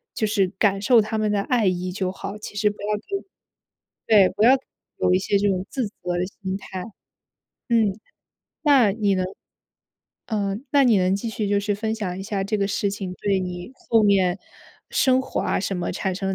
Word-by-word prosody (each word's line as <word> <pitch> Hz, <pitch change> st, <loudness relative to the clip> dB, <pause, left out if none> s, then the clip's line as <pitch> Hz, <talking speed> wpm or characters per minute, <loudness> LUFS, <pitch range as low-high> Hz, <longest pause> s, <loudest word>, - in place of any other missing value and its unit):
就 220 Hz, -, 0 dB
是 205 Hz, -3 st, +2 dB
感 200 Hz, -2 st, +2 dB
受 240 Hz, +1 st, +5 dB
他 215 Hz, +1 st, -3 dB
们 215 Hz, -1 st, +1 dB
的 200 Hz, -1 st, +1 dB
爱 235 Hz, -1 st, +1 dB
意 180 Hz, 0 st, -1 dB
就 185 Hz, -1 st, -2 dB
好。 200 Hz, +2 st, -7 dB
其 210 Hz, -1 st, -9 dB
实 210 Hz, 0 st, +2 dB
不 205 Hz, -, -7 dB
要 210 Hz, 0 st, -1 dB, 1.1 s
对 215 Hz, -2 st, +6 dB
对， -, -, +2 dB
不 210 Hz, -, +1 dB
要 245 Hz, -, +8 dB, 0.5 s
有 180 Hz, -, +2 dB
一 185 Hz, -, +4 dB
些 200 Hz, +1 st, +1 dB
这 205 Hz, +1 st, +1 dB
种 185 Hz, 0 st, -1 dB
自 255 Hz, -6 st, -2 dB
责 205 Hz, -, -16 dB, 0.2 s
的 180 Hz, -, 0 dB, 0.2 s
心 190 Hz, 0 st, -2 dB
态。 190 Hz, -2 st, -7 dB, 0.9 s
嗯。 220 Hz, -3 st, +2 dB, 0.6 s
那， 270 Hz, -9 st, +5 dB
你 205 Hz, -2 st, +1 dB
能 185 Hz, -1 st, 0 dB, 1.0 s
嗯， 205 Hz, +1 st, -2 dB
那 280 Hz, -2 st, +5 dB
你 230 Hz, -4 st, +5 dB
能 185 Hz, +1 st, +2 dB
继 225 Hz, +3 st, -4 dB
续 215 Hz, -2 st, -2 dB
就 200 Hz, 0 st, +2 dB
是 205 Hz, 0 st, -1 dB
分 220 Hz, +2 st, -2 dB
享 190 Hz, -4 st, -4 dB
一 -, -, -5 dB
下 200 Hz, -1 st, -2 dB
这 215 Hz, +1 st, -1 dB
个 200 Hz, -, +1 dB
事 200 Hz, 0 st, 0 dB
情 195 Hz, -3 st, -5 dB
对 195 Hz, 0 st, 0 dB
你 180 Hz, +3 st, -5 dB
后 225 Hz, -3 st, +1 dB
面 195 Hz, -2 st, +3 dB, 0.5 s
生 260 Hz, -1 st, +3 dB
活 -, -, -3 dB
啊 -, -, 0 dB
什 195 Hz, -1 st, -2 dB
么， 175 Hz, -, -2 dB
产 190 Hz, +1 st, -2 dB
生 195 Hz, +1 st, -4 dB
了 190 Hz, -, 0 dB
200 Hz, 225 characters per minute, -23 LUFS, 190-215 Hz, 1.1 s, 要